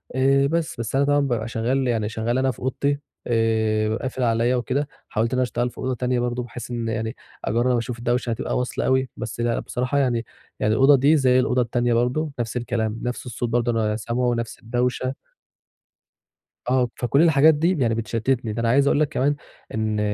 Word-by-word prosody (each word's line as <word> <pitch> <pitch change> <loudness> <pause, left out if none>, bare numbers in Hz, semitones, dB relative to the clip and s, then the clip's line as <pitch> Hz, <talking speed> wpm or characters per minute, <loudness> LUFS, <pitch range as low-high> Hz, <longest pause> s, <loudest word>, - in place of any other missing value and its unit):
آآ، 135 +1 +3
بس. 165 -3 -2
بس 115 +2 -3
أنا 140 +1 +3
طبعًا 145 0 +3
بابقى 120 -6 -1
شغَّال 125 +4 0
يعني 110 -3 0
شغَّال 115 +2 -1
أنا 130 0 +2
في - - -13
أوضتي، 140 +2 -1 0.3
آآ، 110 -2 +1
ب 110 - -1
قافِل 130 0 -3
عليّا 115 +1 +2
وكده، 130 +4 -1 0.2
حاوَلت 115 +3 0
إن - - +1
أنا - - +3
أشتغَل 120 +1 -1
في - - -21
أوضة 130 - -2
تانية 125 0 0
برضه، 120 0 -1
بحيث 125 0 -8
إن 120 -1 -3
يعني 110 0 -2 0.3
أجرّب 120 +2 +2
أشوف 115 0 -4
الدَوشة 120 +1 0
هتبقى 115 0 -2
واصلة 125 0 -2
أوي، 130 0 +2
بس 115 - -6
لأ 120 0 0
بصراحة 125 +3 -2
يعني 120 -4 +1 0.3
يعني 105 - +2
الأوضة 135 +5 +6
دي 145 +4 +4
زي 130 -2 +4
الأوضة 125 0 +2
التانية 120 0 0
برضه، 125 +6 0
نَفْس 120 +1 -2
الكلام، 115 -2 -2
نَفْس 125 0 -3
الصوت 120 0 -3
برضه 120 0 +1
أنا 110 -2 0
سامعه، 120 +3 0
نَفْس 115 -1 -4
الدَوشة. 125 +3 -1 1.5
آه، 125 0 +2
فكل 125 +4 +2
الحاجات 160 -1 +6
دي 165 +4 +1
يعني 115 -4 +2
بتشتِّتني، 115 +1 -1
ده 115 - -3
أنا 115 - +1
عايِز 140 +3 +4
أقول 145 - +3
لك 155 -2 +2
كمان 145 0 +1 0.4
إن 110 -1 -1
120 Hz, 200 wpm, -23 LUFS, 115-130 Hz, 1.5 s, الأوضة